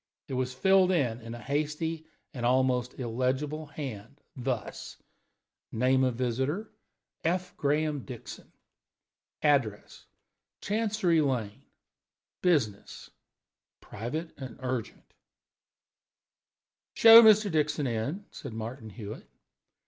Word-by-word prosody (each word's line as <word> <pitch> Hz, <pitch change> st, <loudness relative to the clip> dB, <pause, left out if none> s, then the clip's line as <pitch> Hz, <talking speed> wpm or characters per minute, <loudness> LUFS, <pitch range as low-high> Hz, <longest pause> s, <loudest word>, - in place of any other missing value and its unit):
It -, -, -6 dB
was 130 Hz, 0 st, -1 dB
filled 190 Hz, +7 st, +4 dB
up 125 Hz, -9 st, 0 dB
in 115 Hz, +1 st, -7 dB
a -, -, -9 dB
hasty 155 Hz, +5 st, -2 dB, 0.3 s
and 125 Hz, -4 st, -6 dB
almost 125 Hz, 0 st, +1 dB
illegible 130 Hz, +6 st, -2 dB
hand, 135 Hz, -4 st, -8 dB, 0.2 s
thus: 125 Hz, -3 st, -4 dB, 0.7 s
Name 130 Hz, +3 st, +2 dB
of 130 Hz, -2 st, +1 dB
visitor: 130 Hz, -, -2 dB, 0.5 s
F. 180 Hz, +2 st, -1 dB
Graham 150 Hz, 0 st, 0 dB
Dixon. 125 Hz, -4 st, -10 dB, 0.9 s
Address: 135 Hz, -9 st, 0 dB, 0.5 s
Chancery 205 Hz, -6 st, +1 dB
Lane. 120 Hz, -8 st, -2 dB, 0.8 s
Business: 135 Hz, -, -1 dB, 0.7 s
Private 150 Hz, +10 st, -6 dB
and 130 Hz, -4 st, -8 dB
urgent. 125 Hz, -4 st, -5 dB, 1.8 s
"Show 225 Hz, 0 st, +10 dB
Mr. 215 Hz, -2 st, +6 dB
Dixon 150 Hz, -1 st, 0 dB
in," 130 Hz, -, -3 dB
said -, -, -8 dB
Martin 115 Hz, +1 st, -6 dB
Hewitt. 105 Hz, 0 st, -9 dB
135 Hz, 95 wpm, -29 LUFS, 120-160 Hz, 1.8 s, Show